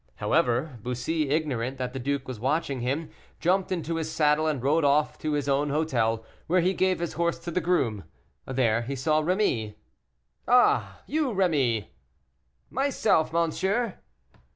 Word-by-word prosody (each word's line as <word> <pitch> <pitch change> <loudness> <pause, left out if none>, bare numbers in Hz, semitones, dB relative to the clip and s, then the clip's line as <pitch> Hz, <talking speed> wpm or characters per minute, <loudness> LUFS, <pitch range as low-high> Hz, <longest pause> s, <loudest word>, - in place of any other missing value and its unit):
However, 125 +2 0
Bussy, 135 +6 -2
ignorant 135 -4 -1
that 125 -1 -4
the 135 - -4
duke 135 +1 -2
was 130 -4 -6
watching 135 +1 -1
him, 135 +7 -2 0.3
jumped 185 +3 +1
into 165 -2 -2
his 160 -1 -3
saddle 150 0 +2
and 150 -3 0
rode 145 +6 +2
off 145 +1 +3
to 155 -1 -2
his 145 -2 -1
own 140 +1 +1
hotel, 115 -7 0 0.2
where 180 +2 +3
he 185 +3 +2
gave 185 -1 +1
his 170 -1 -3
horse 170 +1 0
to 170 0 -7
the 180 - 0
groom. 125 - 0 0.4
There 120 -4 +1
he 130 +4 -4
saw 155 +4 +1
Rémy. 150 - 0 0.7
"Ah! 245 0 +3
you 300 -3 0
Rémy?" 145 - +1 0.8
"Myself, 250 - +1
monsieur." 190 +7 0
150 Hz, 155 wpm, -27 LUFS, 130-170 Hz, 0.8 s, off